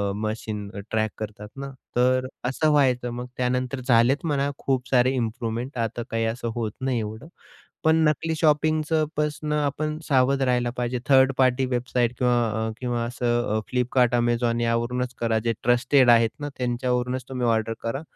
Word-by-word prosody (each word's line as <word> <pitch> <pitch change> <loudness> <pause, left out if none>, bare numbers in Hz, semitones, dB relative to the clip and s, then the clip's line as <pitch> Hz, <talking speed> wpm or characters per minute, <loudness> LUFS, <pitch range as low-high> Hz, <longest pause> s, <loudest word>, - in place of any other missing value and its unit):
Machine 110 -1 -4 0.2
track 110 -1 0
करतात 105 -1 -7
ना, 140 0 -6 0.2
तर 130 +1 +2 0.2
असं 155 +4 +1
व्हायचं. 130 -4 +2
मग 120 +1 -5
त्यानंतर 125 +1 -1
झालेत 125 +5 +3
म्हणा 140 -3 0
खूप 130 -2 -1
सारे 125 0 +4
इम्प्रूवमेंट 120 +2 -3
आता 115 0 -2
काही 115 0 0
असं 115 +1 -3
होत 115 -3 -2
नाही 130 -2 0
एवढं. 110 +5 -6 0.6
पण 160 0 +4
नकली 160 +2 0
शॉपिंगचं 155 0 +2
पासून 150 0 -1
आपण 150 +1 -1
सावध 135 0 +3
राहायला 125 -2 +1
पाहिजे. 125 0 -1
थर्ड 135 0 +6
पार्टी 130 0 +3
वेबसाईट 125 -1 0
किंवा 120 -1 +3 0.3
अ, - - -4
किंवा 120 -2 -2
असं 120 0 0 0.2
अ, - - +1
फ्लिपकार्ट, 125 0 +2
Amazon 120 0 +1
यावरूनच 120 +2 -1
करा. 115 -1 +1
जे 115 +1 -1
ट्रस्टेड 125 +2 +4
आहेत 115 -1 +4
ना 145 0 -4
त्यांच्यावरूनच 125 0 -1
तुम्ही 125 -2 -1
ऑर्डर 115 -1 +1
करा. 115 +5 -2
125 Hz, 160 wpm, -24 LUFS, 115-135 Hz, 0.6 s, थर्ड